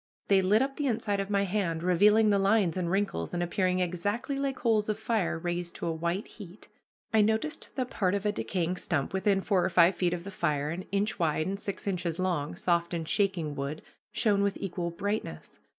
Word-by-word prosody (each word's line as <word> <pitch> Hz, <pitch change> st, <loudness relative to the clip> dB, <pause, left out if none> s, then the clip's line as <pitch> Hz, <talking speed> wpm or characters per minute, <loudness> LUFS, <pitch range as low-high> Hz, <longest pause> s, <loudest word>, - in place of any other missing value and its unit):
They 195 Hz, -1 st, +5 dB
lit 210 Hz, +6 st, +4 dB
up 270 Hz, 0 st, -4 dB
the 290 Hz, -, 0 dB
inside 215 Hz, -4 st, 0 dB
of 195 Hz, 0 st, -2 dB
my 200 Hz, -1 st, +2 dB
hand, 180 Hz, -4 st, -1 dB
revealing 210 Hz, +5 st, +5 dB
the 200 Hz, -, +3 dB
lines 195 Hz, -3 st, +3 dB
and 180 Hz, -2 st, -1 dB
wrinkles, 190 Hz, -, -1 dB
and 175 Hz, -, 0 dB
appearing 185 Hz, 0 st, 0 dB
exactly 205 Hz, +10 st, -2 dB
like 275 Hz, -1 st, -1 dB
coals 220 Hz, -4 st, +1 dB
of 210 Hz, -, 0 dB
fire 220 Hz, -7 st, 0 dB
raised 175 Hz, +1 st, -3 dB
to -, -, -5 dB
a 170 Hz, -, 0 dB
white 170 Hz, +5 st, -2 dB
heat. 195 Hz, -2 st, -12 dB, 0.4 s
I 220 Hz, -, +6 dB
noticed 220 Hz, +9 st, -1 dB
that 255 Hz, -2 st, -2 dB
part 190 Hz, -1 st, +1 dB
of 200 Hz, +1 st, -3 dB
a 210 Hz, -, +3 dB
decayed 180 Hz, -3 st, -2 dB
stump 150 Hz, -3 st, -1 dB
within 195 Hz, 0 st, +2 dB
four 190 Hz, -3 st, +2 dB
or 180 Hz, -, +1 dB
five 175 Hz, +1 st, +5 dB
feet 175 Hz, -1 st, 0 dB
of 170 Hz, -, -7 dB
the 200 Hz, -, -7 dB
fire, 150 Hz, -5 st, -1 dB
an 180 Hz, +3 st, -5 dB
inch 200 Hz, +2 st, 0 dB
wide 155 Hz, -2 st, +1 dB
and 195 Hz, +1 st, -3 dB
six 200 Hz, -1 st, -5 dB
inches 175 Hz, -4 st, -2 dB
long, 175 Hz, -6 st, -1 dB
soft 170 Hz, 0 st, 0 dB
and 165 Hz, -2 st, -4 dB
shaking 190 Hz, -7 st, 0 dB
wood, 140 Hz, +2 st, -4 dB, 0.3 s
shone 205 Hz, -4 st, +2 dB
with 200 Hz, -1 st, 0 dB
equal 175 Hz, -3 st, -3 dB
brightness. 200 Hz, +5 st, -4 dB
190 Hz, 215 wpm, -29 LUFS, 170-205 Hz, 0.4 s, I